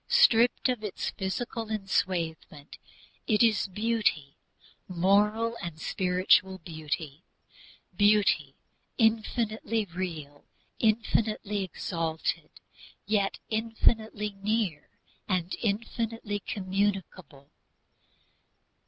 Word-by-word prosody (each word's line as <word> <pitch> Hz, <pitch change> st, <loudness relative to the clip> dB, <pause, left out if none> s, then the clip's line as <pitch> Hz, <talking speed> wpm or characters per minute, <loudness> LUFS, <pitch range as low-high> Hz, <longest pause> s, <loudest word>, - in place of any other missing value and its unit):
Stripped 235 Hz, +1 st, +5 dB
of 250 Hz, -4 st, -1 dB
its 205 Hz, -3 st, -3 dB
physical 225 Hz, +4 st, -3 dB
enswathement 180 Hz, -8 st, -2 dB, 0.5 s
it 215 Hz, -1 st, +4 dB
is 215 Hz, -3 st, +3 dB
Beauty, 210 Hz, -8 st, 0 dB, 0.5 s
moral 210 Hz, +6 st, +2 dB
and 170 Hz, -4 st, -6 dB
spiritual 185 Hz, +2 st, +2 dB
Beauty, 155 Hz, -3 st, -5 dB, 0.7 s
Beauty 205 Hz, 0 st, +3 dB, 0.4 s
infinitely 225 Hz, -1 st, +1 dB
real, 165 Hz, -6 st, -6 dB, 0.4 s
infinitely 215 Hz, -2 st, +1 dB
exalted, 165 Hz, -2 st, -3 dB, 0.6 s
yet 205 Hz, -2 st, +1 dB
infinitely 220 Hz, -1 st, +1 dB
near 205 Hz, -7 st, -1 dB, 0.4 s
and 185 Hz, -2 st, 0 dB
infinitely 225 Hz, -1 st, -2 dB
communicable. 190 Hz, -7 st, -3 dB
205 Hz, 75 wpm, -28 LUFS, 180-220 Hz, 0.7 s, Stripped